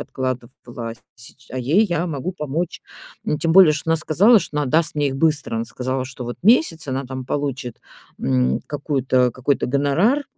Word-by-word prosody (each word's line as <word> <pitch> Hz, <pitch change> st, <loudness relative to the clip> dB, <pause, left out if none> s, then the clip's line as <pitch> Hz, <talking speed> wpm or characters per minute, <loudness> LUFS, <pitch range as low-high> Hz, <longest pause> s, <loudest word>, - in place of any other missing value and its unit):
откладывала 120 Hz, -3 st, -5 dB, 0.2 s
сч 120 Hz, +2 st, -10 dB
а 130 Hz, -, -4 dB
ей 155 Hz, -, +3 dB
я 175 Hz, -1 st, -1 dB
могу 160 Hz, +3 st, -4 dB
помочь! 160 Hz, +1 st, -4 dB, 0.4 s
Н 150 Hz, -, -1 dB
тем 165 Hz, -1 st, +1 dB
более, 185 Hz, -4 st, +8 dB
что 155 Hz, +2 st, -3 dB
она 165 Hz, -, +4 dB
сказала, 205 Hz, +10 st, +4 dB
что 150 Hz, -5 st, -4 dB
она 145 Hz, -, 0 dB
даст 155 Hz, +4 st, +2 dB
мне 145 Hz, -1 st, +1 dB
их 135 Hz, -, -4 dB
быстро! 150 Hz, -6 st, +1 dB
Она 115 Hz, -, -1 dB
сказала, 130 Hz, +2 st, -3 dB
что 130 Hz, -1 st, -8 dB
вот 120 Hz, -, -5 dB
месяц, 200 Hz, -, +3 dB
она 130 Hz, +1 st, -2 dB
там 130 Hz, 0 st, -6 dB
получит, 135 Hz, -4 st, -3 dB, 0.4 s
м, 65 Hz, 0 st, +1 dB
какую-то 135 Hz, -4 st, 0 dB
какой-то 130 Hz, +4 st, -1 dB
гонорар 155 Hz, -, +2 dB
140 Hz, 180 wpm, -21 LUFS, 130-160 Hz, 0.4 s, более